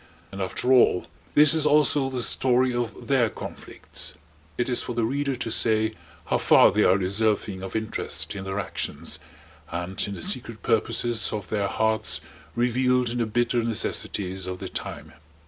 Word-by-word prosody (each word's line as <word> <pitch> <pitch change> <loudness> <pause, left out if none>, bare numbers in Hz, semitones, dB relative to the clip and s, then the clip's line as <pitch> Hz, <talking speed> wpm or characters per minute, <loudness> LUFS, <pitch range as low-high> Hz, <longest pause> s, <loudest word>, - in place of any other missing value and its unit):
And 100 0 -6
after 125 +7 0
all 120 -7 +4 0.3
this 150 0 +7
is 155 -2 +3
also 145 -2 +3
the 125 -2 -2
story 125 +1 +2
of 120 -3 -4
their 130 -5 +3
conflicts. 80 -5 -6 0.4
It 120 - 0
is 125 -2 +2
for 120 - -5
the 115 - 0
reader 140 +3 -1
to 120 -2 -4
say 110 -1 +2 0.3
how - - 0
far - - +6
they 105 - +2
are 95 - +4
deserving 100 0 0
of 95 +2 -7
interest 110 0 -3
in 95 -1 -6
their 95 +1 -3
actions 100 - -3 0.5
and 90 +3 -4
in 100 - -5
the - - -5
secret 125 - +1
purposes 115 0 +1
of 105 -4 -5
their 100 -2 0
hearts 110 +2 +1 0.4
revealed 125 0 +1
in 120 - -3
the 115 - 0
bitter 120 +1 0
necessities 95 -4 -2
of 90 0 -4
the - - -7
time. - - -6
115 Hz, 170 wpm, -25 LUFS, 100-125 Hz, 0.5 s, this